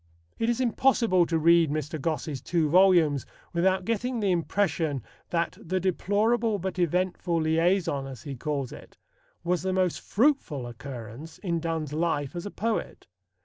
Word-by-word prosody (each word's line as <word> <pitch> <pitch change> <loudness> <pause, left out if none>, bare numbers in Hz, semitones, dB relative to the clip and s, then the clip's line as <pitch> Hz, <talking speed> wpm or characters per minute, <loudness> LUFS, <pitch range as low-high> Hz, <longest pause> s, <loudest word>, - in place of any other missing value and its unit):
It 230 - +1
is 240 +1 0
impossible 235 -7 +3
to 165 - +1
read 165 0 +5
Mr. 155 0 -3
Gosse's 155 -3 -2
two 165 -3 +1
volumes 170 -5 +4 0.3
without 185 +2 +2
getting 235 +3 -1
the 200 -3 +1
impression 165 - 0 0.3
that 170 -1 -1
"the 185 +3 -1
deplorable 210 +5 +1
but 190 0 -4
eventful 175 0 0
liaison," 160 -3 +1
as 130 -3 -9
he 140 -3 -6
calls 140 0 -3
it, - - -12 0.5
was 175 0 0
the 190 +1 -1
most 185 -2 0
fruitful 215 - +1
occurrence 120 +4 -8
in 170 -4 -2
Donne's 160 -3 -3
life 155 -2 -1
as 175 +3 -4
a - - -4
poet. 225 +2 -3
170 Hz, 150 wpm, -27 LUFS, 155-190 Hz, 0.5 s, read